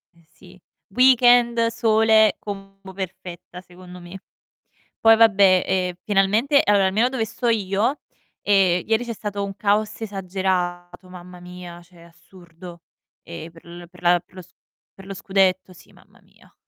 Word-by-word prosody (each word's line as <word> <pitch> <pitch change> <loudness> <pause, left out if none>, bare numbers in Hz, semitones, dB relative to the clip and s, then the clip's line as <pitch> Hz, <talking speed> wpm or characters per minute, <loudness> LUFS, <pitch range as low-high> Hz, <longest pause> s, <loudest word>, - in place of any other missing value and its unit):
Eh 170 -1 -26
sì. 185 0 -19 0.3
Weekend, 240 0 +4
sole, 220 -1 +2
combo 195 -1 -10
perfetta 180 -1 -9
secondo 180 0 -14
me. 175 +2 -12 0.8
Poi 225 0 +6
vabbè, 200 -4 +4
ehm, 185 -1 -1
finalmente, 215 +8 +2
allora 200 -2 +2
almeno 215 +6 +1
dove 255 -3 -3
sto 240 +2 -4
io, 215 +5 -1 0.4
ehm, 190 -3 +2
ieri 225 +2 0
c'è 235 - -5
stato 205 -2 -5
un 195 0 -7
caos 210 +1 -1
esagerato, 185 -3 -4
mamma 180 0 -13
mia, 180 -1 -11
cioè 175 -1 -21
assurdo. 170 0 -16 0.4
Eh 170 0 -10
per 165 - -18
l 175 0 -12
per - - -19
la 175 0 +3
per 180 - -31
lo 185 - -9
s - - -23 0.4
per 195 - -15
lo 195 - -7
scudetto, 190 -2 0
sì, 180 - -19
mamma - - -24
mia. - - -26
190 Hz, 150 wpm, -21 LUFS, 180-215 Hz, 0.8 s, Poi